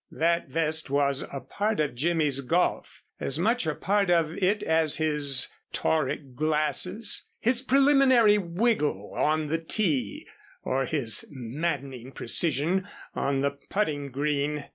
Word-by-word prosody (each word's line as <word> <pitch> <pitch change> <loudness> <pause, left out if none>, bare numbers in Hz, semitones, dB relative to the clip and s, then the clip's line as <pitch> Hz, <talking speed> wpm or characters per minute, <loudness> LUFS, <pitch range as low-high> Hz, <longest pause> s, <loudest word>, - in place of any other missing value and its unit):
That 170 +1 0
vest 160 -2 -1
was 140 -1 +1
a 140 - -5
part 205 - -2
of 150 -2 0
Jimmy's 150 0 +1
golf, 170 +7 -1 0.2
as 135 - -2
much 220 +2 +1
a 155 - -1
part 200 -1 0
of 165 -2 +2
it 200 +2 0
as 160 -2 +2
his 150 -4 +2 0.3
tauric 155 -4 -1
glasses, 155 - -1
his 240 +2 +2
preliminary 265 -5 +4
wiggle 170 - -1
on 155 +1 +1
the 160 +2 -1
tee, 160 - -1 0.4
or 135 +1 0
his 120 -8 +1
maddening 135 -1 -4
precision 170 +5 0 0.3
on 135 -1 -1
the 140 0 +1
putting 145 -1 -3
green. 145 +1 -2
155 Hz, 130 wpm, -26 LUFS, 140-185 Hz, 0.4 s, preliminary